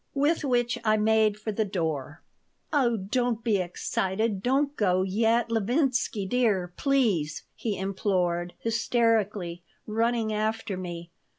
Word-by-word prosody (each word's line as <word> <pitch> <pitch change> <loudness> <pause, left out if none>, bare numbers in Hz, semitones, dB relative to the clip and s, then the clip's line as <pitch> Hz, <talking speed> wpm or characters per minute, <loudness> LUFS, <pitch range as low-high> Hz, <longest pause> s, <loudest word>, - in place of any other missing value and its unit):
With 295 +4 +2
which 245 -3 +1
I 215 -1 +3
made 215 -1 +3
for 215 0 -3
the 220 +1 0
door 160 -7 -3 0.5
"Oh, 245 -6 +3
don't 230 +3 -1
be 220 -4 +2
excited. 190 +3 -1
Don't 275 +5 +1
go 185 -5 +2
yet, 225 +4 +1
Levinsky 240 -1 +1
dear, 195 -6 +1
please," 215 - +1
he 215 -4 -3
implored, 185 -3 -1
hysterically, 220 -6 0 0.2
running 225 0 0
after 215 -1 -1
me. 170 -2 -6
215 Hz, 120 wpm, -27 LUFS, 190-235 Hz, 0.5 s, I